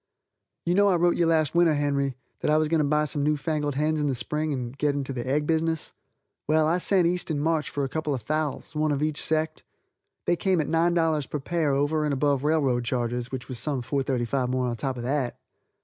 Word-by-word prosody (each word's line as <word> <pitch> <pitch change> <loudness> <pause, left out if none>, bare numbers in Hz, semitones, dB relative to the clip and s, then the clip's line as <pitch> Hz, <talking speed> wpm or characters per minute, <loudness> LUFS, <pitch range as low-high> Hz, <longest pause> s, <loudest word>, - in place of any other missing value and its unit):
You 175 - +2
know 200 +2 +4
I 190 - +4
wrote 175 0 +3
you 170 - +2
last 155 -3 +2
winter, 170 -2 +4
Henry, 140 -2 0 0.2
that - - -1
I 155 - +4
was 155 0 +2
going 165 0 +2
to - - +3
buy 150 +1 +2
some 145 0 -2
new 150 +1 +2
fangled 150 -2 -2
hens 155 +2 +1
in 145 - +1
the 135 - 0
spring 150 +5 -2
and 125 -2 -4
go 150 +1 0
into 140 -1 -1
the 120 -1 -4
egg 145 +3 +1
business. 160 0 0 0.5
Well, 155 +1 +3
I 165 +3 +2
sent 185 -1 +3
east 180 +1 0
in 155 -3 -1
March 155 -1 0
for 145 - -2
a - - 0
couple 155 0 -2
of 120 - -6
fowls, 155 +3 -2
one 155 0 +1
of 145 0 0
each 155 -1 -1
sect. 160 0 -1 0.6
They 175 - +3
came 185 0 +1
at 155 - +1
$9 165 -3 +1
per 150 - -3
pair 155 0 0
over 145 +3 +1
and 150 -2 0
above 140 0 +1
railroad 140 -6 +2
charges, 120 0 -2
which 130 -2 -5
was 130 -3 -4
some 135 -1 -2
$4.35 130 -1 -1
more 130 0 0
on 120 -1 -1
top 130 +2 -3
of 120 - -5
that. 130 -1 -1
150 Hz, 235 wpm, -26 LUFS, 135-160 Hz, 0.6 s, know